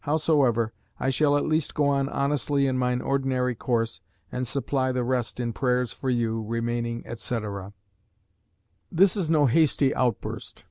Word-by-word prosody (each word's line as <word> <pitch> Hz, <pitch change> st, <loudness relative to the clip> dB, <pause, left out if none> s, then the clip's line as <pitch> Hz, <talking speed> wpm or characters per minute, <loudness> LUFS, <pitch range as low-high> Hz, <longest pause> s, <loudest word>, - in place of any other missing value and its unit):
Howsoever, 140 Hz, -7 st, +2 dB, 0.3 s
I 135 Hz, -, +1 dB
shall 145 Hz, +2 st, +3 dB
at 145 Hz, -, 0 dB
least 155 Hz, -1 st, 0 dB
go 145 Hz, -1 st, +2 dB
on 140 Hz, -1 st, +1 dB
honestly 140 Hz, 0 st, 0 dB
in 130 Hz, -1 st, +1 dB
mine 125 Hz, -1 st, 0 dB
ordinary 130 Hz, -2 st, 0 dB
course, 115 Hz, 0 st, -1 dB, 0.3 s
and 125 Hz, 0 st, -3 dB
supply 135 Hz, 0 st, 0 dB
the 125 Hz, -1 st, -1 dB
rest 125 Hz, -1 st, -1 dB
in 120 Hz, -1 st, -2 dB
prayers 125 Hz, -1 st, 0 dB
for 120 Hz, +7 st, -4 dB
you, 115 Hz, -2 st, 0 dB
remaining, 115 Hz, +1 st, -2 dB
etc." 105 Hz, -4 st, -5 dB, 1.2 s
This 185 Hz, +3 st, +4 dB
is 185 Hz, -6 st, -1 dB
no 155 Hz, -3 st, +4 dB
hasty 140 Hz, 0 st, +3 dB
outburst. 120 Hz, -5 st, -2 dB
125 Hz, 150 wpm, -26 LUFS, 120-140 Hz, 1.2 s, This